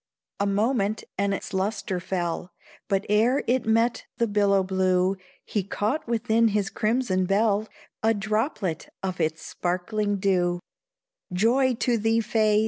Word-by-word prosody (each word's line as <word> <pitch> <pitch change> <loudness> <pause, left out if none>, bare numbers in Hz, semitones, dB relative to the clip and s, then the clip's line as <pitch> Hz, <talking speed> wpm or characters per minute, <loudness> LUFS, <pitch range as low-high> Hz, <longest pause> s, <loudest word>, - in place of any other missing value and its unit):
A 200 - +1
moment 210 +1 +1
and 200 0 0
its 195 - -4
lustre 190 -1 -1
fell, 175 -1 -3 0.4
But 195 0 0
ere 225 +6 +3
it 250 -1 +1
met 230 +2 +2
the 235 - +2
billow 200 -2 +3
blue, 185 0 +2 0.3
He 210 - -1
caught 210 +9 -2
within 230 0 +2
his 210 -1 0
crimson 215 -5 0
bell, 210 +2 +2 0.3
A 225 +1 +3
droplet 215 - -2
of 185 -2 -2
its 160 0 -1
sparkling 205 +4 -1
dew 180 -2 +1 0.7
Joy 245 +7 +3
to 235 0 +1
thee, 225 +2 +2
Fay! 215 -1 +2
205 Hz, 135 wpm, -25 LUFS, 190-225 Hz, 0.7 s, ere